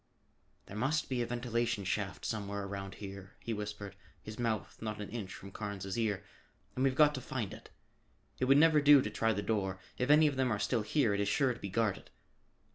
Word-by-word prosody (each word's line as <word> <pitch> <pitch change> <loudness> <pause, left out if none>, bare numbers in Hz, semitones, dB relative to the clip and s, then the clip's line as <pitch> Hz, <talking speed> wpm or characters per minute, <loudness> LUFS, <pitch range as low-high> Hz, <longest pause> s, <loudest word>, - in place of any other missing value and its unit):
"There 100 - -10
must 140 +8 0
be 125 -2 0
a 120 - -1
ventilation 120 -3 -1
shaft 95 -3 -2
somewhere 100 -2 -3
around 100 0 -6
here," 100 -1 -9
he 115 - -4
whispered, 105 -2 -5 0.2
his 110 +1 -9
mouth 115 -3 -2
not 110 -1 -4
an 105 - -5
inch 105 -5 -5
from 100 +1 -9
Carnes' 100 -2 -5
ear, 105 -4 0 0.5
"and 130 - -1
we've 135 -1 +2
got 150 +1 +6
to 130 - -4
find 120 -5 -4
it. - - -12 0.7
It 130 - +2
would 135 +2 +6
never 155 0 +6
do 145 -2 +7
to 105 - -3
try 115 +1 +1
the 105 -1 -2
door; 95 -3 -1 0.2
if 125 - 0
any 150 +1 +7
of 145 -3 +1
them 130 -2 +2
are 110 - +1
still 110 +3 0
here 110 +1 +2
it 100 - -1
is 100 - +1
sure 125 +5 +2
to - - -12
be 100 - -5
guarded. 105 0 -1
110 Hz, 215 wpm, -33 LUFS, 100-130 Hz, 0.7 s, do